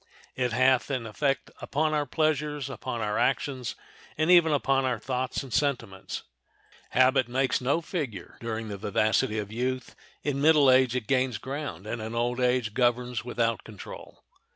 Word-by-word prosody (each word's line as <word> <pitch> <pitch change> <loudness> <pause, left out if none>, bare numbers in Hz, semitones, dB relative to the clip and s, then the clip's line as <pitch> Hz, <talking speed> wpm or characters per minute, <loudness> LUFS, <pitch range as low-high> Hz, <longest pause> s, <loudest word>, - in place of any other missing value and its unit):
It 125 -1 0
hath 130 +2 +3
an 130 -4 -2
effect 135 +5 -1
upon 155 +2 0
our 150 -1 0
pleasures, 150 -2 0
upon 130 -3 -4
our 105 -1 -1
actions, 130 -2 0 0.4
and 155 +3 +3
even 170 -3 +6
upon 135 -2 +2
our 125 -2 0
thoughts 125 +4 -2
and 130 -4 -9
sentiments." 120 -10 -1 0.7
Habit 130 0 +4
makes 130 +2 +1
no 140 +6 +1
figure 135 - -5
during 115 -1 -4
the 100 - -5
vivacity 110 +3 +1
of 105 -1 -4
youth, 130 +3 -3 0.3
in 140 -1 -1
middle 150 -3 +6
age 130 -1 +4
it 125 -4 -1
gains 130 -3 +1
ground, 130 - -5
and 110 +1 -4
in 110 +2 -5
old 120 +1 0
age 125 -3 +1
governs 120 -1 +1
without 115 -1 -1
control. 105 -4 -11
130 Hz, 160 wpm, -27 LUFS, 115-140 Hz, 0.7 s, even